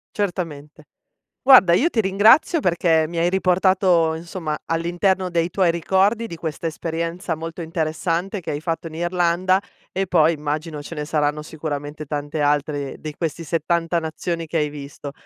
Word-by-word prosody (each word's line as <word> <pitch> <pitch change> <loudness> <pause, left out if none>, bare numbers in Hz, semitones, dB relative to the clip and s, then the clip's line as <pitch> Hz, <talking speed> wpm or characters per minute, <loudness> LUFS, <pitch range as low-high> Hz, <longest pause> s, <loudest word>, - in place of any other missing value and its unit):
Certamente. 160 -7 -4 0.6
Guarda 255 -10 +7
io 260 - +4
ti 230 -9 0
ringrazio 215 - +4
perché 165 - +2
mi 170 - -7
hai 170 +1 +2
riportato 185 -3 +3
insomma 165 -1 -4
all'interno 175 +3 0
dei 170 0 +1
tuoi 180 -1 +2
ricordi, 195 +7 +1
di 170 - -7
questa 160 0 -5
esperienza 165 +2 -3
molto 165 +2 -6
interessante 165 +4 -2
che 170 - -6
hai 145 0 -3
fatto 165 0 -3
in 155 - -12
Irlanda, 175 +2 +1 0.3
e 190 0 -2
poi 165 -2 +4
immagino 150 0 -4
ce 165 - -8
ne 150 -1 -4
saranno 150 -1 0
sicuramente 150 -1 -5
tante 145 +1 -3
altre 145 -1 0
dei 155 -1 -7
questi 165 +1 -4
70 165 +2 0
nazioni 165 +1 -3
che 165 +1 -1
hai 150 -1 +1
visto. 145 -1 -8
165 Hz, 155 wpm, -22 LUFS, 155-180 Hz, 0.6 s, Guarda